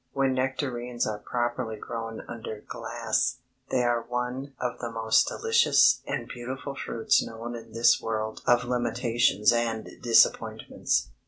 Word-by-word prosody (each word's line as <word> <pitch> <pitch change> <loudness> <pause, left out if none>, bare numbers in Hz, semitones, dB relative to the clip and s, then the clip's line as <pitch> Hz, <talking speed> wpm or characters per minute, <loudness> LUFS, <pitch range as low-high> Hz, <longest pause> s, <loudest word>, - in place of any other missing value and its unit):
When 135 -1 +2
nectarines 130 -2 -2
are 105 -1 -3
properly 120 0 -2
grown 115 +1 -6
under 110 -2 -7
glass, 115 +3 -2 0.3
they 125 - +1
are 120 -1 +2
one 125 +3 -4
of 125 -1 -3
the 120 - -4
most 110 -1 +3
delicious 455 +1 +4
and - - -3
beautiful 130 +3 -6
fruits 115 -4 +1
known 115 +1 -6
in 115 - -10
this 115 +1 +4
world 110 -1 -3
of 120 0 +4
limitations 120 -3 +2
and 115 -2 -1
disappointments. 115 -1 +2
120 Hz, 135 wpm, -27 LUFS, 115-125 Hz, 0.3 s, delicious